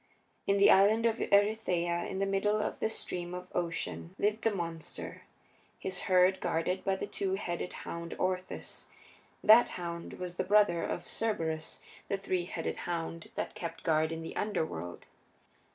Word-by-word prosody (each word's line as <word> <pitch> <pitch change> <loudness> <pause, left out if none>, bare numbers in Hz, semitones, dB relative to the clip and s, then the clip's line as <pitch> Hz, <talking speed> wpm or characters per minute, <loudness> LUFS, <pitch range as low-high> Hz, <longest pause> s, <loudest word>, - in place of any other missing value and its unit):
In 200 - +4
the 200 - +7
Island 210 +4 +5
of 230 -1 +3
Erytheia, 185 -5 +2
in 190 - -4
the 195 - +1
middle 195 +2 +1
of 210 - -2
the - - +1
Stream 180 -5 -4
of 180 0 -7
Ocean, 90 - -3
lived 210 +2 +1
the 225 - +3
monster, 170 -5 -5 0.6
his 185 -1 -3
herd 185 +1 +5
guarded 180 +3 0
by 195 - +1
the - - -3
two 190 -1 -1
headed 175 -2 -3
hound 170 0 -5
Orthus 185 0 -3 0.6
that 220 +3 +8
hound 170 -1 -5
was 180 -1 -6
the - - +1
brother 200 -3 +4
of 175 - -3
Cerberus, 165 -8 -2 0.3
the 200 - 0
three 185 -2 -1
headed - - -3
hound 165 -1 -3
that - - -3
kept 165 -1 -6
guard 155 0 +2
in 165 0 -4
the 165 - -7
Underworld. 160 - -2
180 Hz, 160 wpm, -32 LUFS, 170-200 Hz, 0.6 s, that